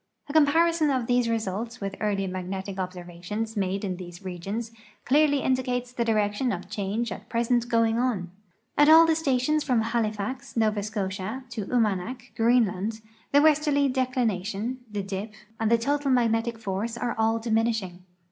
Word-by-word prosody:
A 285 Hz, -, -6 dB
comparison 320 Hz, +1 st, +4 dB
of 260 Hz, -3 st, 0 dB
these 245 Hz, -1 st, +2 dB
results 225 Hz, +2 st, -3 dB
with 195 Hz, -1 st, -4 dB
earlier 200 Hz, -2 st, 0 dB
magnetic 190 Hz, +1 st, -5 dB
observations 185 Hz, +4 st, -5 dB
made 195 Hz, 0 st, -1 dB
in 185 Hz, -2 st, -3 dB
these 175 Hz, 0 st, -10 dB
regions 195 Hz, +6 st, -4 dB, 0.3 s
clearly 285 Hz, +1 st, +3 dB
indicates 250 Hz, -1 st, 0 dB
the 245 Hz, -1 st, -1 dB
direction 215 Hz, +2 st, +1 dB
of 185 Hz, 0 st, -6 dB
change 210 Hz, +2 st, -2 dB
at -, -, -8 dB
present 240 Hz, 0 st, +1 dB
going 230 Hz, -1 st, +2 dB
on. 210 Hz, -9 st, -1 dB, 0.5 s
At 295 Hz, +1 st, +7 dB
all 325 Hz, +1 st, +9 dB
the 325 Hz, -, +3 dB
stations 300 Hz, 0 st, +1 dB
from 250 Hz, -6 st, +2 dB
Halifax, 225 Hz, +2 st, -2 dB
Nova 215 Hz, -2 st, +2 dB
Scotia, 205 Hz, +3 st, -4 dB
to 215 Hz, -4 st, -4 dB
Umanak, 230 Hz, +1 st, -1 dB
Greenland, 225 Hz, -2 st, +1 dB, 0.3 s
the 285 Hz, +1 st, +5 dB
westerly 300 Hz, -2 st, +4 dB
declination, 245 Hz, -3 st, -1 dB
the 205 Hz, -1 st, -3 dB
dip^ 195 Hz, +3 st, -5 dB, 0.3 s
and 225 Hz, -1 st, +1 dB
the 235 Hz, -, +5 dB
total 285 Hz, +4 st, 0 dB
magnetic 235 Hz, -2 st, +2 dB
force 220 Hz, +2 st, -3 dB
are 240 Hz, 0 st, -1 dB
all 225 Hz, +1 st, +2 dB
diminishing. 220 Hz, -5 st, -1 dB
225 Hz, 155 wpm, -26 LUFS, 200-250 Hz, 0.5 s, all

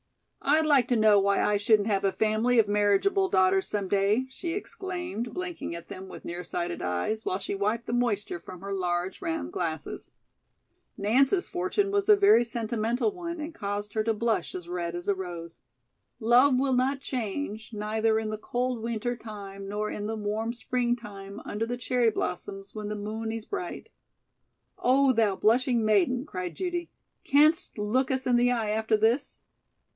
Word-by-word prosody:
"I'd 310 Hz, +3 st, +3 dB
like 280 Hz, -5 st, +4 dB
to 245 Hz, -, +2 dB
know 215 Hz, -2 st, +5 dB
why 200 Hz, 0 st, +2 dB
I 210 Hz, -, +2 dB
shouldn't 210 Hz, 0 st, +3 dB
have 200 Hz, -3 st, +1 dB
a 195 Hz, -, +3 dB
family 220 Hz, +4 st, +1 dB
of 220 Hz, -2 st, +5 dB
marriageable 210 Hz, -, +2 dB
daughters 190 Hz, -, +3 dB
some 205 Hz, -2 st, -2 dB
day," 200 Hz, +6 st, +2 dB
she 330 Hz, +5 st, -4 dB
exclaimed, 350 Hz, -, -5 dB
blinking 360 Hz, -, -4 dB
at 170 Hz, 0 st, -9 dB
them 190 Hz, 0 st, -8 dB
with -, -, -10 dB
near 175 Hz, +1 st, -5 dB
sighted 175 Hz, 0 st, -3 dB
eyes 90 Hz, -, -1 dB
while 185 Hz, -, -1 dB
she 200 Hz, -, -4 dB
wiped 210 Hz, +4 st, -1 dB
the 235 Hz, -, -4 dB
moisture 215 Hz, -7 st, 0 dB
from 180 Hz, +1 st, -11 dB
her 200 Hz, 0 st, -4 dB
large 180 Hz, -1 st, -2 dB
round 330 Hz, -1 st, -3 dB
glasses. 400 Hz, -, -4 dB, 0.9 s
Nance's 265 Hz, -, +3 dB
fortune 375 Hz, +3 st, 0 dB
was 405 Hz, 0 st, 0 dB
a 420 Hz, -, +9 dB
very 400 Hz, -, +6 dB
sentimental 235 Hz, -, -1 dB
one 340 Hz, -3 st, -6 dB
and 310 Hz, +2 st, -5 dB
caused 205 Hz, -2 st, -4 dB
her 215 Hz, -, +1 dB
to 225 Hz, 0 st, +1 dB
blush 220 Hz, -4 st, -1 dB
as 180 Hz, -2 st, -6 dB
red 175 Hz, -1 st, -3 dB
as 175 Hz, 0 st, -6 dB
a 200 Hz, -, +4 dB
rose. 175 Hz, -3 st, -7 dB, 0.6 s
"Love 250 Hz, +3 st, +5 dB
will 265 Hz, 0 st, +1 dB
not 260 Hz, +2 st, +1 dB
change, 230 Hz, -3 st, -4 dB
neither 220 Hz, +1 st, 0 dB
in 220 Hz, -1 st, -2 dB
the 215 Hz, -, -3 dB
cold 245 Hz, +2 st, -2 dB
weenter 235 Hz, +1 st, -2 dB
time 200 Hz, -3 st, -8 dB
nor 210 Hz, +1 st, -2 dB
in 205 Hz, 0 st, -4 dB
the 225 Hz, -, -2 dB
warm 215 Hz, +2 st, -2 dB
spreengtime 230 Hz, -4 st, -3 dB
under 220 Hz, +2 st, -2 dB
the 245 Hz, +1 st, -3 dB
cherry 245 Hz, -1 st, +2 dB
blossoms 195 Hz, -1 st, -4 dB
when 210 Hz, -1 st, -5 dB
the 210 Hz, -, -3 dB
moon 220 Hz, +2 st, -4 dB
ees 225 Hz, -1 st, -5 dB
bright." 370 Hz, -3 st, -5 dB, 0.9 s
"Oh, 265 Hz, +1 st, +4 dB
thou 220 Hz, -4 st, +2 dB
blushing 235 Hz, +2 st, +2 dB
maiden," 215 Hz, +5 st, +2 dB
cried 185 Hz, -, -5 dB
Judy, 350 Hz, -2 st, -3 dB, 0.3 s
"canst 300 Hz, +1 st, +3 dB
look 225 Hz, +6 st, +1 dB
us 260 Hz, 0 st, -1 dB
in 250 Hz, -, +3 dB
the 245 Hz, +1 st, +3 dB
eye 225 Hz, -3 st, 0 dB
after 220 Hz, 0 st, +1 dB
this?" 235 Hz, +6 st, +1 dB
220 Hz, 180 wpm, -28 LUFS, 200-255 Hz, 0.9 s, a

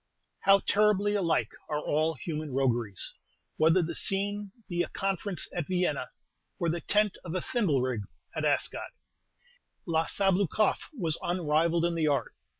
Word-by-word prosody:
How 195 Hz, 0 st, +5 dB
terribly 205 Hz, 0 st, +3 dB
alike 180 Hz, -5 st, +1 dB, 0.2 s
are 150 Hz, -, 0 dB
all 155 Hz, +2 st, 0 dB
human 155 Hz, +1 st, -4 dB
rogueries, 120 Hz, -7 st, +1 dB, 0.4 s
whether 165 Hz, +3 st, +4 dB
the 170 Hz, +1 st, -3 dB
scene 200 Hz, +3 st, -1 dB, 0.2 s
be 175 Hz, -2 st, -1 dB
a -, -, -2 dB
conference 195 Hz, -1 st, -2 dB
at 175 Hz, -4 st, -3 dB
Vienna, 180 Hz, -1 st, 0 dB, 0.5 s
or 170 Hz, -2 st, 0 dB
the 170 Hz, +1 st, -1 dB
tent 210 Hz, -1 st, +2 dB
of 170 Hz, 0 st, -5 dB
a -, -, +1 dB
thimblerig 135 Hz, -, 0 dB, 0.3 s
at -, -, -2 dB
Ascot! -, -, 0 dB, 1.0 s
La 165 Hz, -1 st, +1 dB
Sabloukoff 195 Hz, +1 st, +1 dB
was 165 Hz, -6 st, 0 dB
unrivalled 170 Hz, -1 st, +1 dB
in 170 Hz, -, +1 dB
the 160 Hz, -2 st, +1 dB
art. 140 Hz, -6 st, 0 dB
170 Hz, 145 wpm, -29 LUFS, 155-195 Hz, 1.0 s, How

